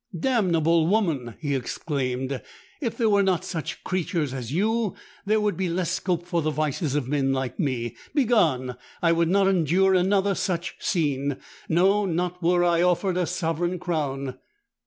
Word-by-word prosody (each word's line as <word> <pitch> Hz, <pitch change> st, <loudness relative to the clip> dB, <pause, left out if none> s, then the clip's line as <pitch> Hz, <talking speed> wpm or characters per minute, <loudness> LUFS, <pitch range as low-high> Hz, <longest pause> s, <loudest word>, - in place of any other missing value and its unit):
'Damnable 170 Hz, -9 st, +2 dB
woman!' 165 Hz, -, 0 dB
he 145 Hz, -3 st, -2 dB
exclaimed; 130 Hz, -1 st, -2 dB, 0.4 s
'_if 235 Hz, -6 st, -2 dB
there 230 Hz, -, +1 dB
were 200 Hz, -1 st, +4 dB
not 190 Hz, -4 st, +1 dB
such 160 Hz, -4 st, -5 dB
creatures 165 Hz, -6 st, -1 dB
as 125 Hz, -3 st, -5 dB
you, 215 Hz, +4 st, 0 dB, 0.3 s
there 215 Hz, +1 st, +3 dB
would 210 Hz, -3 st, 0 dB
be 185 Hz, 0 st, -1 dB
less 175 Hz, 0 st, -1 dB
scope 180 Hz, -2 st, -1 dB
for 175 Hz, -2 st, 0 dB
the 155 Hz, -, 0 dB
vices 155 Hz, -1 st, -1 dB
of 145 Hz, -4 st, -1 dB
men 135 Hz, -1 st, +1 dB
like 130 Hz, -2 st, -2 dB
me. 120 Hz, -4 st, -1 dB, 0.2 s
Begone! 160 Hz, -, +2 dB, 0.3 s
I 165 Hz, -, +5 dB
would 165 Hz, 0 st, +2 dB
not 195 Hz, +1 st, +3 dB
endure 190 Hz, +1 st, +3 dB
another 195 Hz, +2 st, +3 dB
such 175 Hz, -3 st, -2 dB
scene—no, 165 Hz, +6 st, 0 dB
not 180 Hz, +1 st, -2 dB
were 175 Hz, +1 st, +3 dB
I 170 Hz, -1 st, +3 dB
offered 180 Hz, +1 st, +2 dB
a 180 Hz, -2 st, 0 dB
sovereign 175 Hz, 0 st, -1 dB
crown! 140 Hz, -7 st, -3 dB
170 Hz, 155 wpm, -25 LUFS, 145-190 Hz, 0.4 s, I